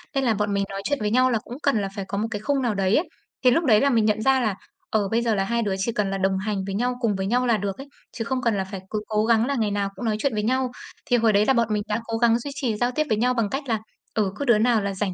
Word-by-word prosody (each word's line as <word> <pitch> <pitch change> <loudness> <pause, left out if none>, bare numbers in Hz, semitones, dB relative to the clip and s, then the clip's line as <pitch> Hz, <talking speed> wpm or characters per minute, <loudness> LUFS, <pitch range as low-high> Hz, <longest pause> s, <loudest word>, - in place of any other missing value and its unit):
Nên 270 - +1
là 235 - +3
bọn 205 -1 -1
mình 200 0 +1
nói 195 0 -5
chuyện 285 +2 -1
với 210 0 -1
nhau 255 +2 +4
là 225 - +1
cũng 245 - -8
cần 250 -7 +2
là 195 - -2
phải 195 -2 -4
có 200 - -3
một 220 +2 0
cái 205 - -3
khung 280 +2 0
nào 240 -4 0
đấy 195 +1 +2
ấy. 320 - +1 0.3
Thì 250 - +6
lúc 330 +6 +2
đấy 215 -5 +5
là 280 - +3
mình 225 -4 +3
nhận 215 0 +1
ra 265 +2 +3
là, 215 -5 0 0.3
ờ, 210 -2 +1
bây 230 +1 +2
giờ 230 -3 +1
là 195 - +1
hai 235 +4 0
đứa 200 -4 -1
chỉ 205 +5 -1
cần 210 -3 -1
là 195 - -1
đồng 190 0 +1
hành 200 -1 -2
với 195 0 -4
nhau, 245 +4 0
cùng 220 -4 +1
với 190 0 -2
nhau 245 +5 +1
là 230 -2 +3
được 200 -1 -3
ấy, 270 +1 -9 0.2
chứ 225 - -4
không 255 +1 -1
cần 230 -4 +1
là 190 - 0
phải 190 0 -7
cứ 215 -1 -2
cố 215 -1 +1
gắng 230 0 +3
là 280 +1 -1
ngày 220 -4 0
nào 200 -1 -1
cũng 215 - -6
nói 220 - +1
chuyện 280 0 0
với 210 -1 -1
nhau. 255 +2 0 0.3
Thì 245 - +3
hồi 225 -1 +3
đấy 205 +1 +4
là 270 - +4
bọn 235 -2 +2
mình 210 -1 0
đã 210 +1 -1
cố 225 -1 -2
gắng 235 0 +3
duy 280 +4 -6
trì 255 -6 -1
giao 245 +3 +1
tiếp 305 +5 0
với 215 - +2
nhau 250 +3 +2
bằng 230 -4 0
cách 270 +5 -3
là, 225 -2 0 0.3
ừ, 205 -3 0
cứ 285 - -3
đứa 235 -4 +5
nào 225 -1 +3
là 200 0 -2
rảnh 190 -1 -2
220 Hz, 345 wpm, -24 LUFS, 205-245 Hz, 0.3 s, Thì